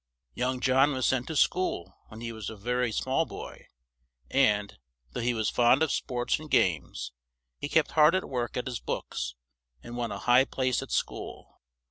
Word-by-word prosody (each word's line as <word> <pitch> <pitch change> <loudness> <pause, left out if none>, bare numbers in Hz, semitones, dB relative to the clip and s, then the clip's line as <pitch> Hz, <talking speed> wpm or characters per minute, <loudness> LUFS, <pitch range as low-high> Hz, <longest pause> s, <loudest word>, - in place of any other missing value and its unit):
Young 125 0 -1
John 135 +3 +4
was 130 -1 0
sent 130 -1 +1
to 160 - -4
school 135 - +1
when 110 +1 -11
he 115 0 -4
was 110 -3 -6
a 110 - -7
ver 125 +5 -1
y 125 - +2
small 130 +7 +1
boy; - - -9 0.6
and, 105 - +2 0.3
though - - -4
he 120 +1 0
was 110 -1 0
fond 125 +5 +4
of 160 - +1
sports 125 0 -1
and 155 0 -10
games, 85 - +1 0.5
he 145 - -4
kept 160 0 +2
hard 155 +2 +6
at 185 - -1
work 120 -3 -3
at 125 - -2
his 125 -2 -3
books 60 0 -4 0.5
and 120 - -8
won 120 -1 -2
a - - -4
high 125 +2 +4
place 130 -2 0
at - - -8
school. - - -4
125 Hz, 190 wpm, -28 LUFS, 115-135 Hz, 0.6 s, hard